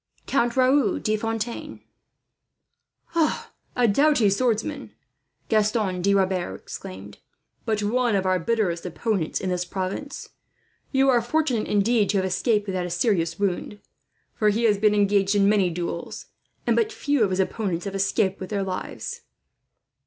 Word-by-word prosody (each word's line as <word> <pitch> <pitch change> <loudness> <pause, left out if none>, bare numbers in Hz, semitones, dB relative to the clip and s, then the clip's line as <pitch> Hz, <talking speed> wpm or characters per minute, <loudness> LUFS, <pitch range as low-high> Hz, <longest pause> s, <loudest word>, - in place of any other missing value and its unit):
"Count 240 -2 0
Raoul 255 -4 +3
de 215 - 0
Fontaine." 225 +1 -4 1.3
"A 335 - -1
doughty 250 -2 +3
swordsman!" 245 +6 -1 0.5
Gaston 215 -4 +1
de 200 +2 +3
Rebers 185 - 0
exclaimed; 95 +2 -9 0.5
"but 215 -2 0
one 240 +1 +1
of 190 -1 0
our 185 -1 +2
bitterest 180 -3 0
opponents 185 -1 -2
in 185 - -3
this 180 0 -1
province. 190 +10 -5 0.6
You 270 0 +3
are 245 -2 +4
fortunate, 245 -2 0
indeed, 210 0 +2
to 205 - +2
have 190 - +1
escaped 210 +3 +1
without 185 -3 -2
a - - -6
serious 170 -2 0
wound; 200 +1 -2 0.5
for 215 -2 +2
he 220 +3 0
has 210 -3 +3
been 210 0 +3
engaged 200 0 +2
in 200 -1 +4
many 200 -3 +3
duels, 170 0 -5 0.4
and - - +2
but 445 -1 +1
few 290 - +1
of 200 - +2
his 185 0 -1
opponents 190 -2 -1
have 200 - -4
escaped 195 0 0
with 185 - -6
their 200 -2 -1
lives." 195 - -5
205 Hz, 150 wpm, -24 LUFS, 185-235 Hz, 1.3 s, are